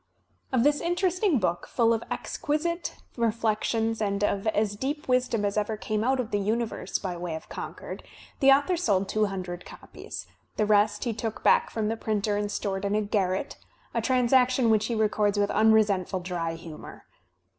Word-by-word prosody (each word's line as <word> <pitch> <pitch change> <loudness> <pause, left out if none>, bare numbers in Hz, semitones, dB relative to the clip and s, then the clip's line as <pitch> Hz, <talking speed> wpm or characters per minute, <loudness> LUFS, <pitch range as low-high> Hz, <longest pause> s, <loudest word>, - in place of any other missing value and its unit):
''' - - -42
Of 255 -3 +3
this 290 +1 +3
interesting 360 0 +1
book, 175 -5 -1
full 230 -2 +3
of 225 - -2
exquisite 335 +4 -2 0.2
reflections 225 0 0
and 200 -1 0
of 200 0 0
as 210 -1 +1
deep 285 +7 -3
wisdom 250 -4 +1
as 200 +1 +1
ever 210 +1 -2
came 215 0 -2
out 260 +2 +2
of 240 -3 -3
the 205 - +1
universe 225 +3 -1
by 185 -2 -4
way 170 -2 -4
of 160 - -9
Concord, - - -7 0.4
the 270 - +5
author 285 +6 +4
sold 200 - +1
two 215 +1 +1
hundred 185 -3 -5
copies; - - -9 0.3
the 215 - +2
rest 210 0 +3
he 235 - -1
took 225 0 -4
back 485 -1 +4
from 220 -2 -2
the 225 +1 -1
printer 210 -1 -1
and 205 0 -1
stored 195 -2 -2
in 200 +1 0
a 215 - +2
garret, 195 -2 -1 0.4
a 230 - 0
transact 255 +1 +3
tion 250 -3 +3
which 215 -1 +2
he 235 - -1
records 210 -1 +1
with 205 0 +2
unresentful 210 -4 +3
dry 170 -2 -3
hiunour. 165 -2 -10
215 Hz, 185 wpm, -27 LUFS, 200-250 Hz, 0.4 s, the